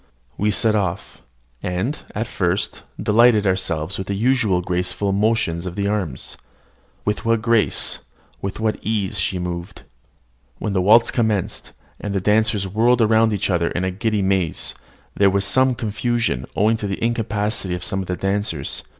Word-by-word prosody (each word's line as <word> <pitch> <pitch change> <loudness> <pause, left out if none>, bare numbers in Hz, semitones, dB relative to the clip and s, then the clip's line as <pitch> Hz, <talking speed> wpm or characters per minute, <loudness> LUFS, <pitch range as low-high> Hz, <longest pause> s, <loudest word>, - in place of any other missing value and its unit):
We 105 - 0
set 110 +1 +2
off, 95 -3 -3 0.4
and, 95 +11 -2 0.2
at 110 +3 -1
first, 95 -1 -1 0.2
delighted 110 -1 +4
ourselves 95 -2 -1
with 95 - -5
the 100 - -2
usual 110 -4 +2
graceful 90 +3 -1
motions 100 -4 0
of 90 - -6
the 100 -1 -1
arms. 95 -10 -3 0.7
With 105 +2 -1
what 115 -1 +1
grace, 115 -2 +2 0.4
with 100 +1 -4
what 110 -1 0
ease, 105 -2 -1
she 95 +1 0
moved! 90 -1 -5 0.7
When 105 - -3
the 95 - +2
waltz 115 +5 +5
commenced, 110 -6 -1 0.3
and 100 -1 -4
the - - +2
dancers 105 0 +2
whirled 115 +5 +3
around 110 0 +4
each 100 -1 -1
other 85 -1 +1
in 90 - -2
the 95 - 0
giddy 105 +1 -1
maze, 95 -4 0 0.4
there 100 -1 +4
was 100 +1 +1
some 130 +3 +3
confusion, 115 - -1
owing 110 +3 +3
to 105 - -4
the 100 - -3
incapacity 110 -5 0
of 90 - -6
some 95 -3 -1
of 95 - -4
the 90 - -2
dancers. 95 -7 -1
100 Hz, 165 wpm, -21 LUFS, 95-110 Hz, 0.7 s, waltz